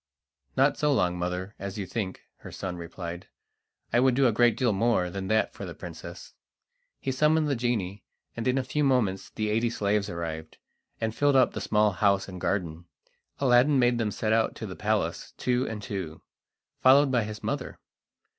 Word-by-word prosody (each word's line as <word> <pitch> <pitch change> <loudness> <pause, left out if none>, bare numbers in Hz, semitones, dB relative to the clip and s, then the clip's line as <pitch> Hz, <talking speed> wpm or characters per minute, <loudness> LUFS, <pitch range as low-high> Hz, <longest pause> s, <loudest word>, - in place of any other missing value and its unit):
"Not 135 +1 +3
so 150 0 +2
long, 90 -10 +2
mother, 90 +3 -3
as 100 +1 -5
you 100 - -3
think," 95 0 -4 0.2
her - - -11
son 95 -2 -5
replied 85 +1 -7 0.7
"I 120 - +5
would 130 0 +4
do 135 +1 +3
a 120 - +5
great 120 +1 +3
deal 120 -5 +2
more 100 -4 +1
than 95 +1 -4
that 110 +2 +1
for - - -8
the - - -6
princess." - - -9 0.7
He 135 - -2
summoned 150 +3 +3
the 140 - +1
genie, 110 -5 -2 0.3
and 115 +1 -3
in 125 +1 +2
a 135 - +1
few 150 +4 -1
moments 120 -9 +1
the 110 -1 -2
eighty 115 +2 +1
slaves 105 -2 0
arrived, 80 -2 -5 0.4
and 110 -1 -1
filled 145 +3 +2
up 130 -1 +5
the - - -4
small 105 -1 +3
house 100 +1 +2
and 90 -2 -8
garden. 85 -4 -2 0.5
Aladdin 135 +2 +4
made 120 -1 +3
them 110 -2 0
set 110 +1 -1
out 110 0 +2
to - - -6
the - - -7
palace, - - -1
two 125 +1 0
and 105 -2 -6
two, 95 -7 -5 0.6
followed 135 +1 +6
by 120 -3 +2
his 105 0 -7
mother. - - -3
110 Hz, 190 wpm, -27 LUFS, 95-125 Hz, 0.7 s, followed